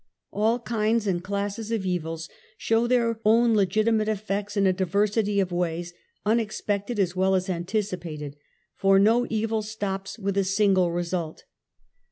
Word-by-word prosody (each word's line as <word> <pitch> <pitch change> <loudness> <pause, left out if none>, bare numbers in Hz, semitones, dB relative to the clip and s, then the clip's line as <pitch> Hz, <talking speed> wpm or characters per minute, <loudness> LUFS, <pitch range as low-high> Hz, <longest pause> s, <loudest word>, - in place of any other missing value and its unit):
All 220 +3 +2
kinds 230 -1 0
and 175 -3 -1
classes 200 +3 -3
of 220 -4 -1
evils 165 -2 -3 0.3
show 225 +2 +1
their 235 -2 +1
own 230 +2 +4
legitimate 215 +2 +2
effects 205 0 -2
in 200 - +3
a 190 - +4
diversity 200 +3 +1
of 185 -2 0
ways, 175 0 -2 0.3
unex 220 0 0
pected 205 +3 -2
as 185 -3 0
well 190 +1 +2
as 185 +1 -1
anticipated, 175 -5 -3 0.4
for 195 -1 +4
no 225 +5 +4
evil 220 0 0
stops 205 -2 -4
with 200 -2 -2
a - - +2
sinde 190 -2 +2
result. 170 -2 -3
200 Hz, 150 wpm, -25 LUFS, 185-220 Hz, 0.4 s, own